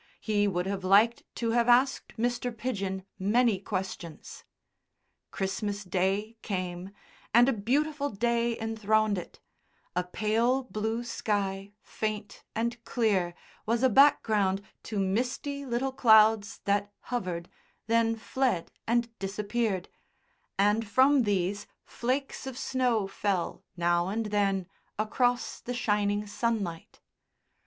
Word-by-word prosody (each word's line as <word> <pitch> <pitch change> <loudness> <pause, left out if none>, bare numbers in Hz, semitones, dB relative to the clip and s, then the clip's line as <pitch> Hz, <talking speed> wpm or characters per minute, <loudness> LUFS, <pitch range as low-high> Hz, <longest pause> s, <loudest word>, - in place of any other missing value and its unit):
He 205 -2 +1
would 180 -2 -1
have 195 -1 -3
liked 210 +5 +4
to 230 -1 -1
have 235 +1 +2
asked 255 +2 +3
Mr. 245 +1 -1
Pidgen 200 -5 -3
many 215 +1 +3
questions. 185 -4 -6 0.9
Christmas 205 +1 -3
Day 195 +4 -1
came, 185 -2 -4 0.5
and 240 +1 +7
a 270 - +3
beautiful 285 +7 0
day 235 +1 0
enthroned 215 -2 +1
it: 175 - -11 0.6
a 180 - +1
pale 225 +7 +1
blue 225 0 -2
sky, 200 -3 -2
faint 215 -1 -4
and 235 +1 -2
clear, 195 -7 +1 0.3
was 230 +2 +1
a 260 - +6
background 210 -7 +4 0.2
to 215 - -4
misty 250 +8 -1
little 255 +2 -1
clouds 220 -4 +5
that 205 0 +1 0.2
hovered, 180 -7 -2 0.4
then 230 0 +2
fled 225 -5 -1 0.2
and 235 0 +1
disappeared, 200 0 -1 0.7
and 210 +3 +2
from 265 +1 +5
these 200 0 0 0.2
flakes 265 +2 -3
of 260 -2 -6
snow 250 -7 +1
fell 195 -2 -2
now 175 0 +2
and 220 +3 -2
then 195 -2 +1 0.3
across 245 +3 0
the 245 - -4
shining 205 -3 +1
sunlight. 205 -6 -3
215 Hz, 115 wpm, -29 LUFS, 195-240 Hz, 0.9 s, and